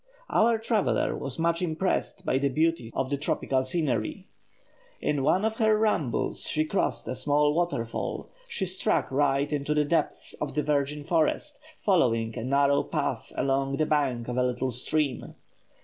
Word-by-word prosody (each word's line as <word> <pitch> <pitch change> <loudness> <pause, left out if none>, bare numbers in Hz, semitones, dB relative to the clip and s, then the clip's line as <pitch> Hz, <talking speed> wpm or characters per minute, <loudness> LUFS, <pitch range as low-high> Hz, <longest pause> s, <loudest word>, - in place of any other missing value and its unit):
Our 230 +1 +4
traveller 220 -1 +1
was 135 -2 -4
much 165 +1 +1
impressed 180 +2 -1
by 130 - +2
the 140 0 +1
beauties 155 -4 0
of 135 +1 -1
the 140 - +1
tropical 135 -2 0
scenery. 130 - -2 0.7
In 145 -2 0
one 180 +9 +2
of 220 0 -1
her 220 -1 +4
rambles 210 - 0
she 155 0 +1
crossed 190 +5 -1
a - - -2
small 145 +3 +2
waterfall; 160 -9 -2 0.2
she 215 - -3
struck 185 -5 0
right 140 +1 +1
into 150 +1 -1
the 150 0 +3
depths 165 +3 -1
of 150 - -3
the 150 - +1
virgin 145 0 0
forest, 170 - 0 0.2
following 115 - +2
a - - -4
narrow 140 +2 +3
path - - -3
along 135 0 0
the 155 - +2
bank 135 -6 0
of 125 0 -3
a 125 - +3
little 125 +1 -1
stream. 140 +3 -1
145 Hz, 165 wpm, -27 LUFS, 130-170 Hz, 0.7 s, Our